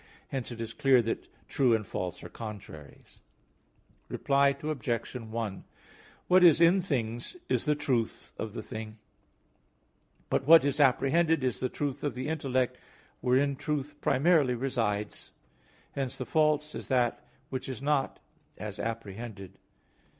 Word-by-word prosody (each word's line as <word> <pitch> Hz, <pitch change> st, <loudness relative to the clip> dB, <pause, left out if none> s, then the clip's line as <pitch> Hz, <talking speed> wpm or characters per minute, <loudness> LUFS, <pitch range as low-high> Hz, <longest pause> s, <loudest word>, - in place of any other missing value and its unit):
Hence 130 Hz, -3 st, -3 dB
it 120 Hz, -, -7 dB
is 115 Hz, 0 st, -4 dB
clear 135 Hz, -1 st, +4 dB
that 115 Hz, -, -3 dB, 0.2 s
true 125 Hz, -4 st, +3 dB
and 110 Hz, -2 st, -2 dB
false 90 Hz, -2 st, -4 dB
are -, -, -6 dB
contraries. 100 Hz, -10 st, -10 dB, 0.9 s
Reply 140 Hz, 0 st, +2 dB
Obj. 125 Hz, -7 st, -2 dB
1: 110 Hz, -4 st, -4 dB, 0.6 s
What 185 Hz, 0 st, +6 dB
is 165 Hz, -3 st, +7 dB
in 170 Hz, +3 st, +5 dB
things 120 Hz, -, -3 dB
is -, -, +1 dB
the 150 Hz, -1 st, +2 dB
truth 130 Hz, -6 st, -2 dB
of -, -, -5 dB
the -, -, -4 dB
thing; 110 Hz, 0 st, -7 dB, 1.3 s
but 135 Hz, -, 0 dB
what 160 Hz, -2 st, +8 dB
is 140 Hz, +1 st, 0 dB
apprehended, 150 Hz, +3 st, +3 dB
is 125 Hz, -3 st, 0 dB
the 130 Hz, -, -1 dB
truth 145 Hz, 0 st, -3 dB
of 145 Hz, -, -1 dB
the 130 Hz, +4 st, -3 dB
intellect, 130 Hz, -5 st, 0 dB, 0.4 s
wherein 135 Hz, +3 st, +2 dB
truth 150 Hz, +1 st, -4 dB
primarily 145 Hz, -3 st, +3 dB
resides. 115 Hz, -5 st, -2 dB, 0.6 s
Hence 135 Hz, -2 st, -3 dB
the 130 Hz, -, -4 dB
false 150 Hz, 0 st, +2 dB
is -, -, -6 dB
that 125 Hz, -3 st, +1 dB, 0.3 s
which 130 Hz, 0 st, -4 dB
is 130 Hz, -, -5 dB
not 140 Hz, 0 st, 0 dB, 0.4 s
as 105 Hz, +1 st, -6 dB
apprehended. 110 Hz, -3 st, -5 dB
130 Hz, 140 wpm, -29 LUFS, 115-145 Hz, 1.3 s, what